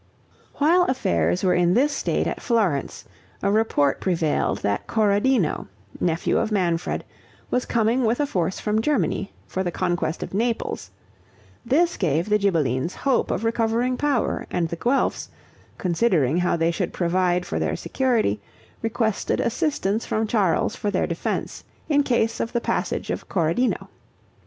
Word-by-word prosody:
While 340 +5 +4
affairs 85 - 0
were 180 - +3
in 175 +1 +3
this 285 +4 +3
state - - 0
at - - -3
Florence, 205 - 0 0.4
a 200 - +2
report 205 -10 +2
prevailed 165 -5 0
that 100 0 -1
Corradino, 210 - +2 0.3
nephew 165 -1 +1
of 225 - -1
Manfred, 175 -5 0 0.5
was 250 - 0
coming 230 +2 +2
with 230 +3 +1
a 295 - +2
force 185 - -1
from 215 +1 0
Germany, 250 -6 0
for 190 - -3
the 175 - -1
conquest 175 -2 -1
of - - -8
Naples; 230 +3 -1 0.7
this 325 +8 +2
gave 165 +1 0
the 210 0 +3
Ghibellines 165 - 0
hope 270 -3 +1
of - - -1
recovering 230 +2 +1
power, 280 -3 0
and 170 -2 -1
the 170 - -3
Guelphs, 245 +11 0 0.5
considering 170 - +2
how 175 -1 +1
they 165 +1 +2
should 165 - -3
provide 180 0 +1
for - - -3
their - - 0
security, 230 - 0 0.4
requested 225 -2 0
assistance 235 - 0
from 220 +1 -1
Charles 205 -6 +1
for 210 - -2
their 195 - +1
defense, 170 -1 -3 0.3
in 290 -1 +4
case 230 -4 +1
of 230 - -2
the 240 - +2
passage - - -2
of - - -5
Corradino. 175 +8 0
205 Hz, 150 wpm, -23 LUFS, 170-235 Hz, 0.7 s, While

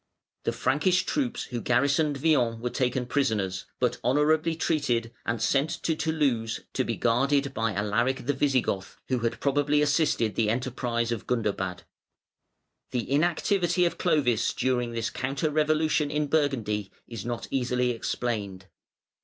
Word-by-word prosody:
The - - +2
Frankish 180 +6 +1
troops 270 -5 -1
who 120 -2 -5
garrisoned 140 +5 +2
Vienne 130 -6 +2
were 120 +1 -3
taken 125 -1 0
prisoners, 110 -9 -1
but 125 -1 0
honourably 155 +6 +2
treated 125 -8 0
and 115 0 0
sent 140 +7 +2
to 160 - +1
Toulouse 140 -9 0
to - - +1
be - - -2
guarded 135 +4 +1
by 115 0 -1
Alaric 115 +6 0
the 145 - +1
Visigoth, 130 -8 0
who 130 -1 +1
had 115 0 -2
probably 145 +1 +2
assisted 145 -6 +2
the 110 -2 +1
enterprise 120 -1 -1
of 115 -4 -4
Gundobad. 100 -6 -1 1.1
The 125 0 -3
inactivity 175 +3 +2
of 170 - -2
Clovis 135 - +2
during 125 -2 0
this 115 -2 -2
counter 135 +6 -2
revolution 155 -1 +2
in 150 0 0
Burgundy 120 -10 0 0.2
is 115 -5 -6
not 120 0 -4
easily 125 -1 +1
explained. 105 -5 -3
130 Hz, 140 wpm, -27 LUFS, 115-150 Hz, 1.1 s, The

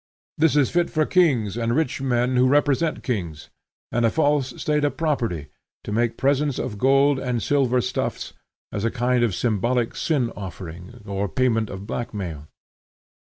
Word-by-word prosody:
This 160 -1 +4
is 145 -3 +3
fit 175 0 +1
for 155 -2 +1
kings, 135 - +2
and 115 0 0
rich 140 -3 0
men 125 -1 +1
who 125 +1 +4
represent 145 +3 +2
kings, 85 - -4 0.4
and 120 - +1
a 115 - +4
false 145 -2 0
state 150 -1 0
of 145 - 0
property, 115 - -1 0.3
to - - -6
make 115 +2 0
presents 140 0 +1
of 105 -5 -4
gold 135 +2 +4
and 125 -2 -1
silver 130 -3 +2
stuffs, 125 +2 -3 0.4
as 105 - -3
a 115 - +2
kind 125 +1 +1
of 110 -7 +1
symbolical 120 +1 0
sin 130 -8 0
offering, 90 -1 -9
or 100 -1 -2
payment 115 -1 +1
of 95 +1 -7
black 115 +1 -4
mail. 80 -7 -5
125 Hz, 165 wpm, -23 LUFS, 105-140 Hz, 0.4 s, This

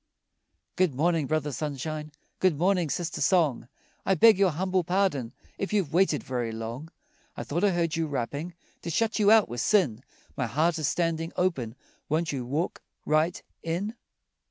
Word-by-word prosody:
Good 180 -7 +2
morning, 160 0 +1
Brother 155 -1 0
Sunshine, 150 +2 -4 0.3
Good 185 -6 +3
morning, 180 -1 +2
Sister 170 +1 -3
Song, 155 -7 +2 0.4
I 195 - +2
beg 215 +3 +6
your 195 -2 +5
humble 185 +3 0
pardon 170 -10 0 0.3
If 195 - -3
you've 190 -8 0
waited 175 -4 +3
very 120 -3 -2
long. 115 +7 -6 0.5
I - - -3
thought 170 +6 -2
I 205 - +5
heard 170 -3 0
you 165 -1 0
rapping, 145 +5 -4 0.3
To 170 - -5
shut 225 +7 0
you 205 -1 +5
out 220 -1 +6
were 120 - -5
sin, 130 - +2 0.3
My 125 - -1
heart 160 +8 +1
is 155 - 0
standing 165 -1 -1
open, 135 -11 -1 0.3
Won't 160 +2 0
you 130 -4 -4
walk 155 +7 -2 0.2
right 155 +3 +2 0.2
in? 175 +7 -2
160 Hz, 165 wpm, -27 LUFS, 140-185 Hz, 0.5 s, beg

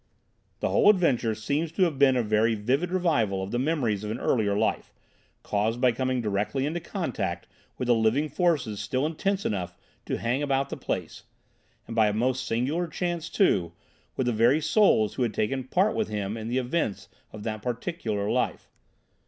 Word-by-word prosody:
"The - - +1
whole - - +5
adventure 135 - +3
seems 145 +9 -2
to 190 - +2
have 160 -6 0
been 135 -2 +5
a 120 - +2
very 110 +1 +2
vivid 130 +11 0
revival 120 - +1
of 95 - -6
the 120 - 0
memories 125 -8 0
of 105 - -4
an 110 - -2
earlier 100 -4 +1
life, - - -1 0.5
caused 110 +3 0
by 125 -1 +4
coming 130 +1 -1
directly 105 +6 -1
into 160 +4 -2
contact 145 - -3 0.3
with 125 - -3
the 120 - +5
living 115 +6 +2
forces 145 - 0
still 130 +2 -1
intense 195 +5 -1
enough 90 -3 -3 0.3
to - - -1
hang 120 +4 -1
about 140 -1 0
the - - -2
place, - - -4 0.6
and, 115 - -7
by 110 -2 +4
a 105 - 0
most 125 +4 0
singular 140 +10 0
chance, 170 0 -3
too, 90 - +2 0.4
with 130 - -1
the 120 - +1
very 120 +7 +4
souls 155 - +3
who - - -4
had 115 -3 0
taken 130 +4 -1
part 190 +10 +1
with 220 - 0
him 105 0 -3
in 110 -1 -6
the 120 +2 -1
events 120 - -1 0.2
of 105 -1 -9
that 110 -1 -4
particular 115 -3 -3
life. - - -1
125 Hz, 185 wpm, -27 LUFS, 110-155 Hz, 0.6 s, whole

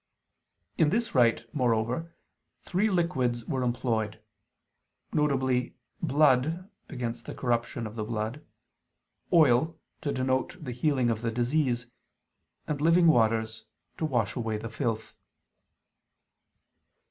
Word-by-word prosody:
In 155 - +5
this 230 +5 0
rite, 115 -3 +4
moreover, 125 +5 0 0.5
three 195 +4 +1
liquids 130 - 0
were 130 - -2
employed: 115 -3 -1 0.9
viz. 130 -4 +1 0.3
blood, 155 +3 +2 0.2
against 120 -5 -5
the - - -6
corruption 115 -2 -1
of 110 - -6
the 110 -1 -3
blood; 110 +5 -3 0.9
oil, 155 0 +4 0.2
to 145 - -1
denote 130 +4 -1
the 145 -7 -6
healing 125 -1 +1
of 110 -1 -2
the 115 - -1
disease; 120 +1 0 0.8
and 145 -2 -3
living 170 +2 +5
waters, 110 -6 +2 0.3
to 160 - 0
wash 120 -9 0
away 115 -4 -2
the 115 +1 -7
filth. 115 -1 -3
125 Hz, 110 wpm, -28 LUFS, 115-150 Hz, 0.9 s, In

